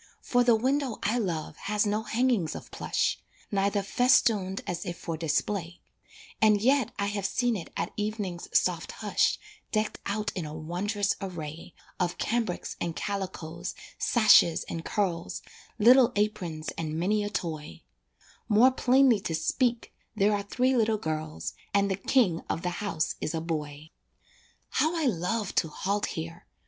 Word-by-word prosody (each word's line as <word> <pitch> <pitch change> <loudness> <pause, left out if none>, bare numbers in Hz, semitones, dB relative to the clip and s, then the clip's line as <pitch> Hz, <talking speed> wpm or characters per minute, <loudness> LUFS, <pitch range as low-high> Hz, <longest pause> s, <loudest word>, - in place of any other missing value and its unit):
For 245 0 +2
the 240 -2 +5
window 260 +1 0
I 220 +4 +1
love 165 -8 -3
has 210 +1 0
no 210 +1 0
hangings 220 -7 +1
of - - -9
plush, - - 0 0.3
Neither 200 0 +1
festooned 205 -4 +3
as 175 -1 -3
if 175 -3 -5
for 165 -2 -4
display, 170 +3 -1 0.6
And 215 -1 +5
yet 260 +1 +3
I 200 - 0
have 200 -1 -1
seen 245 -1 +1
it 175 -5 -6
at - - -2
evening's 210 -4 -3
soft - - +1
hush - - +1 0.3
Decked 215 -1 -1
out 210 +1 -1
in 180 - -3
a 150 0 -6
wond'rous 195 +6 -1
array 165 -3 -7 0.2
Of 175 -2 0
cambrics 225 -6 -2
and 170 -2 -2
calicoes, 180 -4 -4 0.2
sashes 215 -7 +5
and 165 - -5
curls, 180 -5 -2 0.3
Little 245 +3 +7
aprons 185 -7 -1
and 155 -1 -3
many 205 +5 +1
a 205 - -2
toy 155 - -5 0.7
More 230 +5 +6
plainly 260 -2 +4
to 165 -4 -3
speak 235 +9 0 0.2
there 210 0 +3
are 205 - 0
three 255 +6 +1
little 220 -2 +2
girls, 155 -3 -4 0.2
And 200 0 +3
the - - +1
king 195 -4 +2
of 165 - -2
the 180 - 0
house 180 -6 -1
is 155 - -2
a - - 0
boy. 155 -2 -5 0.8
How 315 +3 +1
I 315 - 0
love 210 -1 -1
to 165 - +3
halt 200 +6 -1
here! 165 +1 -6
200 Hz, 155 wpm, -28 LUFS, 170-220 Hz, 0.8 s, Little